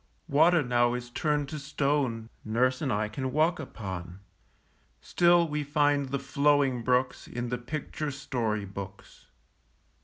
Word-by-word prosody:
Water 160 +3 +4
now 120 -1 +2
is 120 0 -6
turned 150 +1 0
to 155 - -5
stone 140 -5 -1
Nurse 125 +4 +1
and 140 -4 0
I 105 -1 0
can 130 +5 -4
walk 160 +4 +2
upon; 95 - -7 0.8
Still 175 -1 +3
we 150 -1 -2
find 145 -1 +1
the 140 - -1
flowing 140 -2 +2
brooks 125 +2 0
In 120 0 -4
the 125 0 -2
picture 150 +4 -4
story 125 -7 -2
books. 100 0 -10
135 Hz, 135 wpm, -28 LUFS, 120-150 Hz, 0.8 s, Water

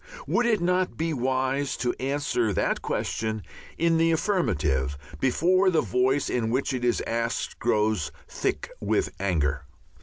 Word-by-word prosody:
Would 240 0 +2
it 220 -5 +2
not 180 +1 +1
be 165 0 -1
wise 130 +1 0
to 120 0 0
answer 135 -4 0
that - - 0
question 110 -2 -2 0.3
in 165 0 +3
the 165 0 +4
affirmative 110 - 0 0.2
before 185 +8 +3
the 165 -4 +3
voice 130 +3 +1
in 115 -3 0
which 130 +3 0
it 125 -1 -3
is 120 -1 +1
asked 115 +1 -2
grows 105 -9 +1 0.2
thick - - -2
with - - 0
anger? 75 -7 0
130 Hz, 145 wpm, -26 LUFS, 110-165 Hz, 0.3 s, the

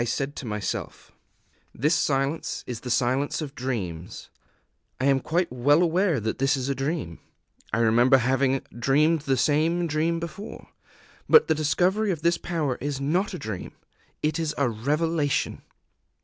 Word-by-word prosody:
I - - +1
said 135 +4 -2
to 130 - -6
myself: 105 -2 -4 0.6
"This 150 +7 +2
silence 140 -1 0
is 120 -3 -5
the 125 - -7
Silence 130 +3 +1
of 150 -4 -5
Dreams; 95 -10 -5 0.7
I 130 - 0
am 135 -1 +4
quite 170 +4 -1
well 145 +7 +4
aware 175 -3 +2
that 110 +1 -3
this 135 +1 +2
is 130 +1 -3
a - - +2
dream. 135 - -3 0.5
I 110 - 0
remember 120 +4 +5
having 130 +1 +1 0.2
dreamed 150 +6 +3
the 135 -2 0
same 160 +6 +2
dream 165 +2 0
before. 170 +5 -8 0.6
But 460 - +7
the - - +3
discovery 180 +7 +1
of 165 -5 -2
this 170 0 +2
power 155 -7 -2
is 140 0 -3
not 180 +8 0
a - - -4
dream: 110 - -6 0.5
_it 155 +2 0
is 160 -2 -2
a 140 - +2
revelation! 145 +6 -1
145 Hz, 160 wpm, -25 LUFS, 130-165 Hz, 0.7 s, But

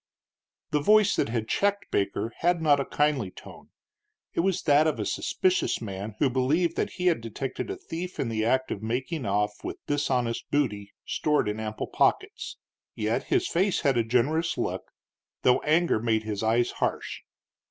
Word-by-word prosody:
The 150 - +2
voice 210 +4 +5
that - - 0
had 115 -2 -2
checked 200 - 0
Baker 100 +3 -1
had 175 0 +2
not 150 -3 +4
a 140 - -1
kindly 145 -9 +1
tone; - - -13 0.6
it - - -2
was 190 +1 +1
that 150 +1 +5
of 150 -7 -1
a 105 - -1
suspicious 185 - 0
man, 100 -1 -6
who 140 - +3
believed 145 +7 +1
that - - -1
he 180 - -4
had 170 -9 +3
detected 125 - -5
a 390 - -2
thief 180 - -6
in 130 - 0
the 110 -1 -1
act 130 +3 +1
of 100 - -3
making 125 +6 -2
off 105 +1 -1
with - - -5
dishonest 125 -5 -1
booty 105 -9 -1
stored 150 -7 +1
in 105 +1 -2
ample 110 0 -3
pockets. - - 0 0.4
Yet 110 +1 -1
his 370 -1 +1
face 190 +3 +1
had 135 -2 +2
a 120 - +3
generous 140 +9 +1
look, - - -3 0.5
though 125 - +5
anger 160 -4 +2
made 110 -1 +1
his 105 -2 -3
eyes 115 +2 +2
harsh. - - -2
130 Hz, 175 wpm, -27 LUFS, 110-165 Hz, 0.6 s, voice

